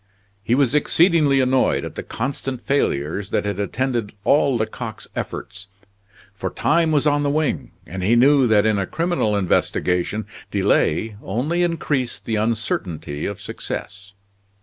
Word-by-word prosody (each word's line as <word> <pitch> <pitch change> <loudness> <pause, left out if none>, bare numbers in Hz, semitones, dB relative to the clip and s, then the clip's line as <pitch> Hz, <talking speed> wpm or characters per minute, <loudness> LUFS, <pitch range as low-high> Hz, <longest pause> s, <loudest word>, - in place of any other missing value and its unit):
He 115 +4 +1
was 135 -2 +2
exceedingly 150 -2 +4
annoyed 130 0 +2
at - - -7
the - - -5
constant 130 0 -4
failures 100 - -1
that - - 0
had 100 -1 -2
attended 120 +1 -1
all 140 +1 +3
Lecoq's 110 0 -4
efforts; 100 0 -6 0.7
for 100 - -4
time 165 +1 +2
was 150 -1 +2
on 145 -1 +3
the 145 - +1
wing, 155 0 -1
and 95 +3 -6
he 105 +6 +3
knew 135 +2 +5
that 110 -2 +4
in 110 -2 +2
a 95 - -1
criminal 165 -10 0
investigation 90 +1 0 0.2
delay 105 +7 +1
only 140 - -1
increased 150 -7 -1
the 110 - -1
uncertainty 100 -9 -2
of 100 - -5
success. 100 0 -6
120 Hz, 145 wpm, -21 LUFS, 100-145 Hz, 0.7 s, knew